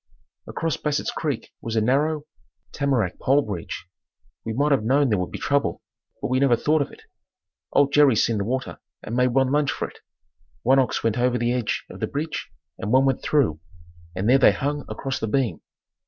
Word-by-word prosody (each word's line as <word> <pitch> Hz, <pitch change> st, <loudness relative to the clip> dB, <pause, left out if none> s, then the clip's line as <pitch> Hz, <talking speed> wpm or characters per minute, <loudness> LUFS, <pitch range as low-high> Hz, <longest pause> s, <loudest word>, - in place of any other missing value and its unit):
Across 165 Hz, -2 st, -2 dB
Bassett's 150 Hz, -1 st, -1 dB
creek 145 Hz, -7 st, -3 dB
was 115 Hz, 0 st, -4 dB
a -, -, +4 dB
narrow, 145 Hz, +6 st, +1 dB, 0.5 s
tamarack 130 Hz, -10 st, 0 dB
pole 140 Hz, +2 st, +3 dB
bridge. 100 Hz, -8 st, -6 dB, 0.6 s
We 115 Hz, -, -4 dB
might 145 Hz, +6 st, +1 dB
have 135 Hz, -6 st, +3 dB
known 135 Hz, +4 st, +3 dB
there 105 Hz, -4 st, +2 dB
would 90 Hz, -, -2 dB
be -, -, -6 dB
trouble 140 Hz, 0 st, 0 dB, 0.4 s
but -, -, -3 dB
we 130 Hz, +1 st, +2 dB
never 135 Hz, -3 st, +4 dB
thought 150 Hz, +5 st, +1 dB
of 140 Hz, -, -3 dB
it. -, -, -15 dB, 0.7 s
Old 140 Hz, 0 st, +3 dB
Jerry 145 Hz, -4 st, +6 dB
seen 110 Hz, 0 st, +2 dB
the -, -, 0 dB
water 130 Hz, +5 st, -3 dB, 0.2 s
and 115 Hz, -, -4 dB
made 125 Hz, +1 st, +3 dB
one 135 Hz, -1 st, +3 dB
lunge 145 Hz, -1 st, +2 dB
for -, -, -3 dB
it. -, -, -16 dB, 0.6 s
One 135 Hz, +3 st, +5 dB
ox 130 Hz, -3 st, 0 dB
went 115 Hz, +1 st, +1 dB
over 125 Hz, 0 st, +2 dB
the 120 Hz, 0 st, 0 dB
edge 125 Hz, -3 st, -1 dB
of -, -, -11 dB
the -, -, -1 dB
bridge 150 Hz, +3 st, -4 dB, 0.3 s
and 105 Hz, -, -3 dB
one 130 Hz, +2 st, +5 dB
went 135 Hz, -2 st, +1 dB
through, 125 Hz, -, +1 dB, 0.6 s
and 95 Hz, +3 st, -1 dB
there 130 Hz, +3 st, +6 dB
they -, -, +6 dB
hung 145 Hz, +1 st, -2 dB
across 135 Hz, -1 st, -3 dB
the 110 Hz, -, -2 dB
beam. 125 Hz, +1 st, 0 dB
130 Hz, 200 wpm, -24 LUFS, 115-145 Hz, 0.7 s, Jerry